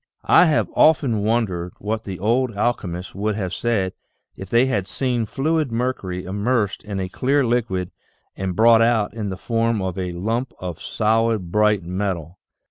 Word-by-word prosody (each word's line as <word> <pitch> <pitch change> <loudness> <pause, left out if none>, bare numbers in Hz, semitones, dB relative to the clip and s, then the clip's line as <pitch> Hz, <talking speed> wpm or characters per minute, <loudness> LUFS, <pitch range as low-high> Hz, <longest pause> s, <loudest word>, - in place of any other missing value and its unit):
I - - +6
have 155 -3 +2
often 140 -8 +4
wondered 100 -6 -1
what 110 +2 -3
the 95 -2 -5
old 115 +3 0
alchemists 95 -6 -2
would 105 +1 -1
have 95 -3 -3
said 105 -6 0 0.4
if 95 - -9
they 120 +4 +4
had 100 -8 -1
seen 125 -4 -1
fluid 155 +2 0
mercury 115 -7 -2
immersed 105 +2 -1
in 100 -2 -4
a 95 - -2
clear 135 +8 +1
liquid 110 -7 -1 0.4
and 95 -2 -3
brought 115 +2 +6
out 115 -3 +2
in 105 -3 -4
the 95 - -5
form 115 0 0
of 95 -1 -3
a 90 -1 -3
lump 115 +8 -2
of 90 -3 -6
solid, 110 -4 0
bright 105 -2 +3
metal. 90 -2 -3
105 Hz, 165 wpm, -22 LUFS, 95-120 Hz, 0.4 s, I